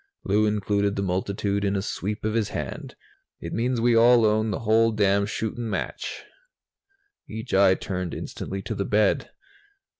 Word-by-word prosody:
Lou 105 +1 +2
included 100 -1 0
the 100 - -1
multitude 100 +2 -1
in 100 0 0
a 95 - 0
sweep 105 +2 -4
of 110 - 0
his 110 -2 0
hand. - - -6 0.4
"It - - -6
means 120 +1 0
we 120 0 +3
all 120 0 +6
own 110 +1 +2
the 105 - -3
whole 115 +1 +3
damn 100 -1 +2
shootin' 110 +2 -3
match." 100 - -4 1.1
Each 110 +1 -6
eye 95 -1 +5
turned 90 -3 -4
instantly 95 0 -6
to - - -4
the 100 - -2
bed. 105 +1 +1
105 Hz, 160 wpm, -25 LUFS, 100-110 Hz, 1.1 s, all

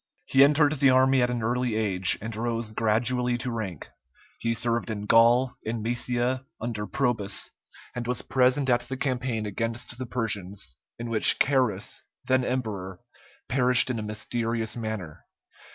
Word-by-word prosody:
He 135 +1 +5
entered 145 +1 +4
the 135 -2 +3
army 130 0 +4
at 125 - +2
an 120 -2 -2
early 120 0 0
age, 95 -5 +1
and 110 +1 -5
rose 115 0 -2
gradually 120 +3 +1
to 125 +1 -3
rank; 100 -9 -5 0.5
he 115 0 -1
served 115 +1 0
in 105 -2 -4
Gaul, 120 +4 +4
in 110 0 -4
Moesia, 120 +2 -1 0.2
under 110 -3 -4
Probus, 115 -7 -1 0.4
and 120 -1 -5
was 125 0 -1
present 130 +1 +2
at 120 -2 +3
the 125 +2 -6
campaign 125 -5 -2
against 115 +4 -4
the 130 - -4
Persians, 100 - -3 0.2
in 115 0 -6
which 110 - +6
Carus, 125 -8 0 0.2
then 130 0 +2
emperor, 105 -8 -3 0.5
perished 125 0 +4
in 115 - -3
a - - -3
mysterious 115 +1 -3
manner. 110 -9 -6
120 Hz, 150 wpm, -26 LUFS, 110-125 Hz, 0.5 s, which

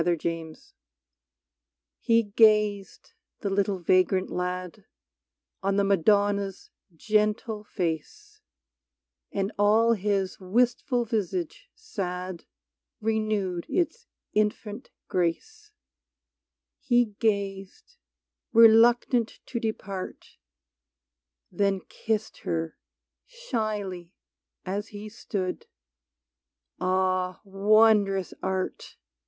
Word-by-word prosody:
46 170 -2 0
MADONNA 165 -1 -3
T - - -23 1.4
Te 230 0 +3
gazed, 210 -3 +2 0.3
the 200 - -2
little 195 0 +1
vagrant 185 +1 +2
lad, 180 +2 -4 0.8
On 195 0 0
the 200 - +3
Madonna's 200 +1 +1 0.2
gentle 210 +2 0
face; 205 - -5 0.9
And 195 +1 -1
all 220 +3 +5
his 200 -2 -1
wistful 240 +5 +1
visage 195 -7 -3
sad 180 -2 -5 0.5
Renewed 215 -5 -1
its 450 +7 -1 0.3
infant 210 +1 -1 0.2
grace: 350 - -2 1.1
He 240 -4 +2
gazed, 200 -3 -2 0.6
reluctant 230 +1 +5
to 240 - -4
depart, 200 -4 -5 1.1
Then 200 -1 +1
kissed 220 -1 -3
her, 165 -1 -3 0.5
shyly, 215 - -4 0.5
as 200 +3 -3
he 210 0 -8
stood 190 -4 -4 1.1
Ah, 185 0 0
wondrous 200 -1 +3
Art 190 0 -3
200 Hz, 80 wpm, -27 LUFS, 185-220 Hz, 1.4 s, all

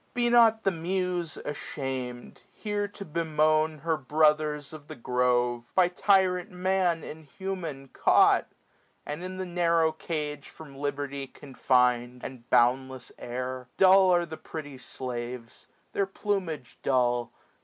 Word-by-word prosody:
Be 240 -1 +2
not 225 -2 +5
the 195 - +2
Muse 180 -1 -2
asham'd, 130 -4 -5
here 205 -1 -2
to 200 0 -10
bemoan 155 -1 +1
Her 165 0 0
brothers 150 +1 +1
of 150 -2 -11
the - - -8
grove, 120 -1 0
by 180 -2 +5
tyrant 185 0 +2
Man 180 -2 0
700 - - -9
Inhuman 160 -2 -6
caught, - - +4 0.6
and 150 +4 -5
in 185 0 -6
the 185 - -3
narrow 170 -2 +2
cage 150 -3 -5
From 145 -4 -13
liberty 140 -1 -4
confined, 125 -3 0
and 125 -2 -9
boundless 130 +1 +2
air. 125 +1 -5
Dull 190 0 +6
are 175 -1 +3
the 160 -1 -8
pretty 145 -4 -8
slaves, 120 -2 -7 0.3
their 200 - 0
plumage 185 - -3
dull. 120 -2 +1
155 Hz, 130 wpm, -28 LUFS, 130-180 Hz, 0.6 s, Dull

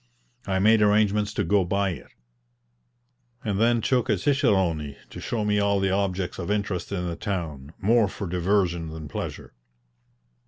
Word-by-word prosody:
I 95 -1 +1
made 110 +3 +4
arrangements 105 0 +3
to - - +1
go 100 -1 +3
by 100 +2 0
it, 70 -8 -8 1.4
and 100 -2 -1
then 120 0 +3
took 125 +1 +1
a - - +3
cicerone 95 - +1 0.2
to - - -8
show 110 -3 -2
me 105 0 +2
all 100 -1 +2
the 95 0 +1
objects 95 -2 -1
of 85 - -4
interest 100 -3 -2
in 90 -3 -2
the 85 - -3
town, 80 -8 -4
more 110 +2 +3
for 100 +1 -6
diversion 90 -1 0
than 80 -1 -7
pleasure. - - -6
100 Hz, 160 wpm, -25 LUFS, 90-105 Hz, 1.4 s, made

